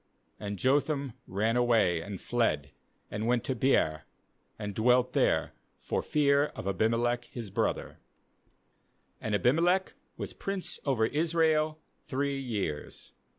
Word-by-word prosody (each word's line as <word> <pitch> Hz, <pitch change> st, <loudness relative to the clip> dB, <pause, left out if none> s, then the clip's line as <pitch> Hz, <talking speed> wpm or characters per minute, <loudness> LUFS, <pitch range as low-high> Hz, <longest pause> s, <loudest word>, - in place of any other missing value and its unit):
21And 100 Hz, -1 st, -3 dB
Jotham 140 Hz, -, +1 dB
ran 110 Hz, +5 st, 0 dB
away, 115 Hz, -9 st, +3 dB
and 100 Hz, 0 st, -6 dB
fled, 75 Hz, -, 0 dB, 0.4 s
and 105 Hz, +2 st, -2 dB
went 120 Hz, -1 st, +2 dB
to 130 Hz, -, -1 dB
Beer, 115 Hz, -, +2 dB, 0.5 s
and 105 Hz, -2 st, -4 dB
dwelt 125 Hz, +4 st, +3 dB
there, -, -, +2 dB, 0.2 s
for -, -, -2 dB
fear 145 Hz, -1 st, +3 dB
of -, -, -6 dB
Abimelech 115 Hz, +4 st, +1 dB
his 115 Hz, -6 st, -8 dB
brother. -, -, -1 dB, 1.2 s
^And 105 Hz, -, -1 dB
Abimelech 170 Hz, -, +2 dB, 0.2 s
was -, -, -5 dB
prince 195 Hz, -2 st, -4 dB
over 130 Hz, -6 st, +2 dB
Israel 155 Hz, +1 st, +1 dB, 0.2 s
three 140 Hz, +1 st, -1 dB
years. 100 Hz, -, -4 dB
120 Hz, 120 wpm, -30 LUFS, 105-140 Hz, 1.2 s, away